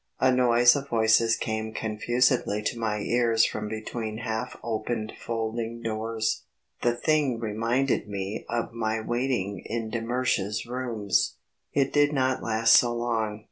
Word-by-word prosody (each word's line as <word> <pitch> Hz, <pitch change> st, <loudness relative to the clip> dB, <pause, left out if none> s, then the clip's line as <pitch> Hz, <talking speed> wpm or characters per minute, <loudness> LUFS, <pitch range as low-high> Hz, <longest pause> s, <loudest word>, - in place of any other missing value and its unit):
A 130 Hz, -, +4 dB
noise 120 Hz, 0 st, +5 dB
of 140 Hz, 0 st, -4 dB
voices 115 Hz, 0 st, +4 dB
came 110 Hz, 0 st, -3 dB
confusedly 110 Hz, -1 st, +1 dB
to 115 Hz, +2 st, -2 dB
my 105 Hz, -2 st, -1 dB
ears 115 Hz, 0 st, +3 dB
from 105 Hz, 0 st, -3 dB
between 110 Hz, 0 st, -4 dB
half 115 Hz, +1 st, -4 dB
opened 110 Hz, -1 st, -3 dB
folding 115 Hz, 0 st, -3 dB
doors; 110 Hz, 0 st, -2 dB, 0.4 s
the 120 Hz, 0 st, +2 dB
thing 140 Hz, -2 st, +1 dB
reminded 115 Hz, +3 st, 0 dB
me 100 Hz, +1 st, -4 dB
of 120 Hz, 0 st, -2 dB
my 110 Hz, -1 st, -1 dB
waiting 115 Hz, -5 st, -1 dB
in 115 Hz, -1 st, -4 dB
de 120 Hz, -, -2 dB
Mersch's 115 Hz, -3 st, -1 dB
rooms. 120 Hz, -4 st, -1 dB, 0.4 s
It 140 Hz, -1 st, +1 dB
did 145 Hz, 0 st, +4 dB
not 130 Hz, -2 st, +1 dB
last 115 Hz, 0 st, +3 dB
so 120 Hz, -, +3 dB
long. 115 Hz, -3 st, -1 dB
115 Hz, 140 wpm, -27 LUFS, 110-120 Hz, 0.4 s, noise